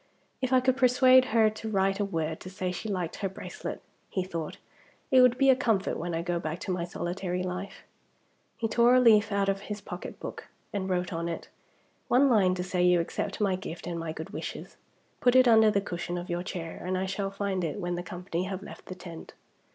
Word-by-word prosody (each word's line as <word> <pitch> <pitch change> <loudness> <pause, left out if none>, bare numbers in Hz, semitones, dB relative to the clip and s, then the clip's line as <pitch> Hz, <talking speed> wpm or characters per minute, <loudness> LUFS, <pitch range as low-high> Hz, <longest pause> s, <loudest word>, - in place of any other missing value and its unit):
"If 260 -1 -1
I 255 -1 +5
could 260 0 +2
persuade 255 0 +6
her 225 -2 +4
to 220 +1 -6
write 195 -1 +1
a 205 - +1
word 160 -4 -2
to 185 - -9
say 185 -1 -3
she 200 +5 -5
liked 180 -4 -2
her 195 - -2
bracelet," 190 - -7 0.3
he 185 - -1
thought, 165 -4 -5 0.5
"it 260 -1 +7
would 250 -1 +5
be 270 0 +6
a - - +5
comfort 225 -6 +1
when 170 0 -3
I 165 - -2
go 175 0 -1
back 160 0 -3
to 190 - -3
my 175 -2 -1
solitary 180 0 -3
life." 185 +2 -5 0.7
He 225 - -1
tore 235 +2 +4
a - - +7
leaf 220 -3 +5
out 200 0 +1
of 195 0 +1
his 210 0 -3
pocket 180 -2 -8
book - - -7 0.3
and 190 -2 -2
wrote 180 -1 -1
on 170 +1 -2
it, 170 - -6 0.6
"One 265 +2 +4
line 190 -5 +4
to 180 - -3
say 180 -1 -1
you 180 -1 +5
accept 195 +3 -3
my 200 -3 +2
gift 180 -2 -7
and 170 -1 -3
my 165 -1 -3
good 160 0 -7
wishes. - - -6 0.4
Put 245 0 +3
it 255 -1 +7
under 220 -2 +7
the 200 -1 +1
cushion 175 -2 -4
of 175 +1 -5
your 175 0 -1
chair, 175 -3 -6
and 185 +1 -1
I 190 - -1
shall 195 +1 -2
find 195 -2 -2
it 165 +5 -3
when 175 -2 -2
the 175 - -2
company 180 -1 -4
have 190 0 -5
left - - -11
the 185 - -6
tent." 175 -3 -10
190 Hz, 230 wpm, -28 LUFS, 175-215 Hz, 0.7 s, it